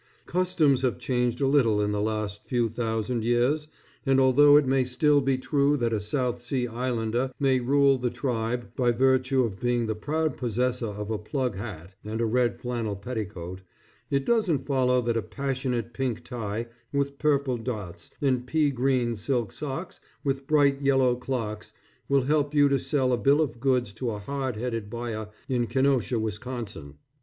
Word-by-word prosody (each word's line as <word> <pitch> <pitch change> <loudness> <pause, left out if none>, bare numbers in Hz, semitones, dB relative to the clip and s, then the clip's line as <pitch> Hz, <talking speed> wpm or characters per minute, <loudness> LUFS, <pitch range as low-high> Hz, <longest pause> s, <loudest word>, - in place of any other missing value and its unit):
Customs 165 -7 +2
have 130 -2 0
changed 125 -1 -1
a 135 - +3
little 125 -7 +3
in 105 0 +1
the 105 0 -1
last 105 -1 -3
few 120 -2 +1
thousand 115 0 -2
years, 125 +6 +1 0.4
and 135 -2 +3
although 145 +3 +7
it 150 - +4
may 130 0 +2
still 145 +3 +3
be 135 -1 +1
true 140 +2 +2
that 120 -3 0
a 110 - +1
South 125 +2 -1
Sea 125 0 -1
Islander 120 +1 -1
may 135 -2 +3
rule 135 +1 +3
the 125 0 0
tribe 120 -1 -2
by 125 -2 +2
virtue 130 +1 +3
of 105 -5 -3
being 120 -1 +1
the 110 - -1
proud 155 +9 -2
possessor 125 0 -1
of 105 +1 -5
a 110 - -1
plug 125 +1 -2
hat 95 -4 -7
and 110 +1 -4
a 115 - +1
red 120 +1 +1
flannel 120 -4 -3
petticoat, 100 -4 -6 0.5
it 140 -1 0
doesn't 210 - +1
follow 125 -2 +2
that 120 -1 0
a - - +1
passionate 130 -4 -3
pink 130 -4 -2
tie 115 -2 -4 0.3
with 140 0 -1
purple 140 -4 +1
dots, 110 -7 -5
and 130 -3 +1
pea 150 +1 +2
green 125 -2 +1
silk 115 0 -1
socks 150 +5 -5 0.2
with 135 -1 -2
bright 145 -2 +3
yellow 135 -3 +3
clocks, 120 -4 -4 0.4
will 140 -1 +3
help 145 +1 +1
you 145 -1 +6
to 140 -1 +2
sell 130 -4 +1
a - - +2
bill 140 +3 +4
of 125 -7 -1
goods 125 -4 +1
to 125 +2 -3
a 105 - -3
hard 130 +4 -3
headed 115 -2 -3
buyer 115 -2 -4 0.2
in 120 -2 0
Kenosha, 130 -2 +1
Wisconsin. 110 - -5
125 Hz, 175 wpm, -26 LUFS, 115-135 Hz, 0.5 s, although